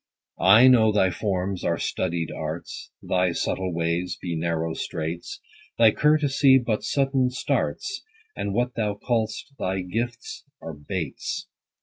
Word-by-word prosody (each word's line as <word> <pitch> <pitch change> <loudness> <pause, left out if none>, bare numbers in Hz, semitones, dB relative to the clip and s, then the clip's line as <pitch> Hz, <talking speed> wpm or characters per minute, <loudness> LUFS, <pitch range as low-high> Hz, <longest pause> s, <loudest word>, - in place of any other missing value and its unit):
I 105 +7 +7
know 115 -4 +6
thy 95 -3 +3
forms 95 -1 -2
are - - 0
studied 85 -3 -2
arts, 80 +2 -6
Thy 90 -1 +1
subtle 95 +2 -2
ways 85 +1 -1
be 85 -2 -4
narrow 80 0 -1
straits; 80 +1 -5 0.4
10 115 - +5
Thy 110 - +8
courtesy 145 -2 +4
but 120 -4 -1
sudden 135 -2 +1
starts, 390 - -2 0.3
And 100 0 -3
what 120 +4 0
thou 105 -3 -1
call'st 110 +4 -2
thy 95 +1 -1
gifts 120 - -4 0.2
are 80 - -7
baits. 75 +1 -5
100 Hz, 135 wpm, -25 LUFS, 85-120 Hz, 0.4 s, Thy